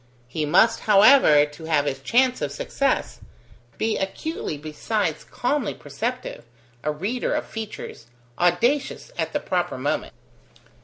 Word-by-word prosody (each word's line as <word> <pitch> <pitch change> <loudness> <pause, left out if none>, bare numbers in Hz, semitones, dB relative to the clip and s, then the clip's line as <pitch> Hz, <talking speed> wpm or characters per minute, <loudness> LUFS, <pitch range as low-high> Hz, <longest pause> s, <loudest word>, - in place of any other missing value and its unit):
He 150 +4 -3
must, 225 +9 +4
however, 200 - +7
to 150 +2 -11
have 150 -3 +2
his 135 -2 -2
chance 250 - +2
of 145 - -2
success, 270 - -1 0.6
be 220 0 0
acutely 195 - -4
besides 155 +4 -2
calmly 250 -1 -2
perceptive, 225 - -5 0.4
a 150 - 0
reader 200 +12 -2
of - - -2
features, 215 - -8 0.3
audacious 250 - +1
at - - -1
the - - -1
proper - - -2
moment. - - -2
195 Hz, 125 wpm, -24 LUFS, 150-245 Hz, 0.6 s, however